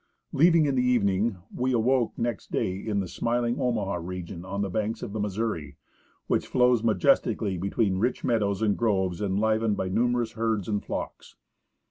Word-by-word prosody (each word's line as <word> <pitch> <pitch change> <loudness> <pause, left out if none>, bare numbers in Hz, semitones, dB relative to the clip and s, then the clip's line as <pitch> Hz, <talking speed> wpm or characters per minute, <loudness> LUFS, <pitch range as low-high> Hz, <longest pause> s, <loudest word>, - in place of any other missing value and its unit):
Leaving 165 +1 +5
in 140 - +1
the 130 - +2
evening, 110 -4 +1 0.2
we 130 +1 0
awoke 120 +1 +1
next 120 -2 -3
day 90 - 0
in 100 +1 -2
the 95 - -4
smiling 120 +5 -1
Omaha 110 -7 0
region 85 0 -6
on 100 +2 -3
the 100 - -2
banks 110 +3 -2
of 100 - -6
the 110 - -3
Missouri, 100 -8 -3 0.5
which - - 0
flows 125 -2 +3
majestically 105 -1 +2
be 95 +3 -3
tween 100 -4 +1
rich 120 +5 0
meadows 105 -3 +1
and 105 -2 +2
groves 95 -6 0
enlivened 110 +2 +1
by 95 - -2
numerous 120 +2 +1
herds 110 -3 -1
and 105 -1 -1
flocks. - - -6
110 Hz, 170 wpm, -27 LUFS, 95-120 Hz, 0.5 s, Leaving